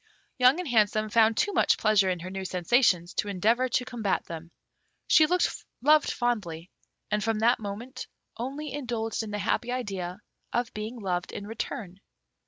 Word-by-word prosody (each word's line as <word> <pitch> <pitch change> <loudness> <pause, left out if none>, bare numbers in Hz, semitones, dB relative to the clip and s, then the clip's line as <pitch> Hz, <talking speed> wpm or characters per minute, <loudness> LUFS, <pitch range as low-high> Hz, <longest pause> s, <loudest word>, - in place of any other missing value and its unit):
Young 255 +6 +5
and 360 - -3
Handsome 215 -3 +2
found 225 0 +4
too 410 - +1
much 370 - +3
pleasure 210 -3 +3
in 180 -2 -2
her 185 +2 -6
new 190 0 -4
sensations 180 -1 +2
to - - -1
endeavour 225 +6 +1
to 250 +1 0
combat 230 -6 -1
them. 165 0 -8 0.6
She 310 - +6 0.5
loved 300 +4 +4
fondly, 195 -9 -2 0.4
and 210 -1 +1
from 225 0 0
that 235 +3 +3
moment 220 +5 -6 0.3
only 275 +4 -5
indulged 235 -6 -2
in 220 - -6
the 210 - -3
happy 235 +4 -1
idea 195 -8 -4 0.3
of 240 -1 -1
being 215 +3 -5
loved 180 -3 -2
in 200 - -6
return. 205 -3 -5
220 Hz, 165 wpm, -27 LUFS, 195-245 Hz, 0.6 s, She